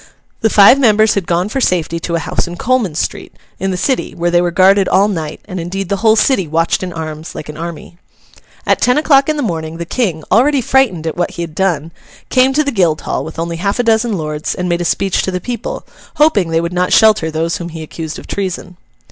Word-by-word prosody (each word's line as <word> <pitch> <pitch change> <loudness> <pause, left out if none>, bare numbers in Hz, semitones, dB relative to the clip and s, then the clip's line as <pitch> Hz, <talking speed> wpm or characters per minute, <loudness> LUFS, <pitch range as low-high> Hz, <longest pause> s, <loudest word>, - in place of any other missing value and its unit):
The 220 - +2
five 210 +6 +6
members 220 -4 +4
had 195 -4 -2
gone 175 +2 0
for 265 +5 -3
safety 170 -5 0
to 170 +1 -3
a - - 0
house - - -2
in 175 - -7
Coleman 235 -9 0
street, - - -4 0.2
in 195 - -1
the 185 - -2
City, 260 +7 -1
where 175 0 -1
they 175 0 +3
were 175 - +1
guarded 190 +2 +4
all 200 +2 +4
night; 160 -7 -4
and 185 -3 -6
indeed 185 +2 -4
the 200 - 0
whole 220 +1 +4
city 220 - +2
watched 165 +2 0
in 185 -1 -4
arms 160 -1 -7
like 150 - -7
an 150 - -7
army. 170 +1 -8 0.7
At - - +1
ten 250 +2 +3
o'clock 285 -2 +3
in 305 - 0
the 290 - -1
morning, 165 -5 -4
the 170 - -5
King, 170 -6 -2
already 275 +5 +4
frightened 240 -10 +1
at 160 - -3
what 175 - 0
he 170 - -2
had 165 -2 -8
done, 165 -3 -1 0.4
came 260 0 +4
to 305 +3 +2
the 285 - -1
Guildhall, 170 - 0
with 160 +2 -9
only 165 0 -3
half 200 +4 -1
a 245 - +1
dozen 225 -2 +1
lords, 155 -1 -3
and 180 - -3
made 175 0 0
a - - -2
speech 195 +2 0
to - - -2
the 180 -1 -2
people, 245 - -5 0.3
hoping 235 - +3
they 165 0 +1
would 170 +1 -4
not 180 0 0
shelter 215 -7 +4
those 160 +1 -2
whom 170 -1 -6
he 160 -1 -7
accused 160 0 -7
of - - -10
treason. 185 -2 -5
180 Hz, 240 wpm, -15 LUFS, 165-220 Hz, 0.7 s, five